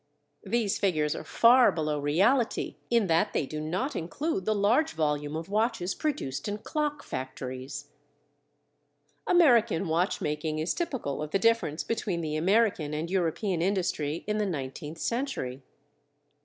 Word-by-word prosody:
These 225 -4 0
figures 155 -6 +1
are - - -6
far 245 +2 +6
below 155 -2 -1
reality 200 - +1
in 235 -3 +3
that 170 +4 +2
they - - 0
do 155 +3 -5
not 185 - -2
include 315 - -2
the 215 - +1
large 215 - +2
volume 150 -1 -1
of 165 +1 -4
watches 210 -3 0
produced 150 - -3
in 205 0 -2
clock 295 +5 -2
factories. 130 +2 -6 1.4
American 235 - +4
watch 170 +4 +1
making 150 +1 -2
is 155 +3 0
typical 245 - -3
of 150 - -4
the 195 - +2
difference 195 -7 +1
between 205 -6 -2
the 155 -2 -3
American 175 -3 +2
and 165 +3 -3
European 180 0 0
industry 170 -5 -1
in 210 0 -1
the 210 - +1
nineteenth 150 -1 -5
century. 230 - -3
175 Hz, 140 wpm, -28 LUFS, 150-230 Hz, 1.4 s, far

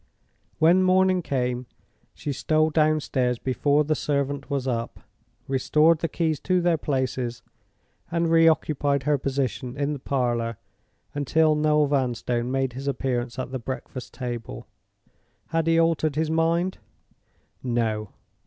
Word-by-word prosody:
When 170 +4 +5
morning 185 0 +3
came, 125 -4 -2 0.5
she 145 - -4
stole 155 +3 +1
downstairs 150 -5 +1
before 145 +4 +1
the 155 +1 0
servant 140 -1 -2
was 140 -2 -2
up, 115 -2 -3 0.5
restored 150 +4 +3
the 165 - -1
keys 160 -4 -1
to 185 +3 +1
their 170 -2 +2
places, 130 -4 -2 0.7
and 170 0 0
re 165 0 +6
occupied 145 -3 +1
her 145 0 +1
position 135 -1 -2
in 145 +1 0
the 145 - -5
parlor 120 -4 -1 0.6
until 155 +2 +2
Noel 150 0 +3
Vanstone 125 -3 -1
made 135 -1 -1
his 135 +3 -6
appearance 125 -2 -2
at 130 0 -4
the 130 - -3
breakfast 130 +1 -6
table. 120 - -6 0.8
Had 165 0 0
he 165 0 +4
altered 160 -3 +2
his 160 0 0
mind? 165 +3 +1 0.8
No. 115 -4 -1
140 Hz, 135 wpm, -25 LUFS, 125-160 Hz, 0.8 s, re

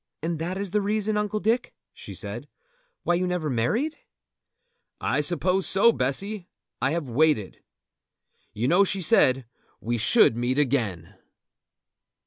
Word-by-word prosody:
"And 165 -1 -2
that 175 +3 -3
is 200 -2 -4
the 210 +1 +1
reason, 210 +1 0
Uncle 210 0 -1
Dick," 230 +3 -1 0.2
she - - -10
said, - - -6 0.6
"why 175 - +1
you 180 +1 0
never 175 -5 -2
married?" 220 - -1 1.0
"I - - 0
suppose 180 +4 +1
so, 205 +5 +5
Bessy. 185 - -2 0.3
I 130 - +2
have 160 -2 -2
waited. 125 -5 +1 0.9
You 110 +4 -2
know 175 +7 +5
she 195 -1 -1
said 130 -4 +3 0.3
we 120 +1 -2
should 110 +1 +4
meet 120 +3 -1
again!" 115 - -1
170 Hz, 135 wpm, -25 LUFS, 130-200 Hz, 1.0 s, so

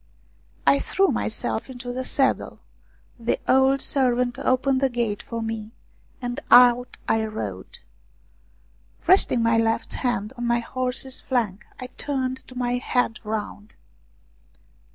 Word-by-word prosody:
I 280 - +5
threw 390 +6 +1
myself - - -2
into 245 -1 -6
the 260 +1 -3
saddle, 270 0 0 0.6
the 230 0 0
old 265 +1 +4
servant 250 -2 +1
opened 260 +1 +1
the 270 - +3
gate 235 -4 -2
for 230 -1 -5
me, 225 0 -5 0.5
and 245 +1 -4
out 245 0 +6
I 220 0 +2
rode. 220 0 -6 1.3
Resting 355 -10 +4
my 230 0 +3
left 225 0 0
hand 240 -3 -2
on 240 - -2
my 235 0 +3
horse's 255 +2 -2
flank, 225 -7 -2
I 255 - -5
turned 260 0 -3
my 245 0 0
head 245 -2 0
round. 210 -1 -5
245 Hz, 125 wpm, -24 LUFS, 230-260 Hz, 1.3 s, out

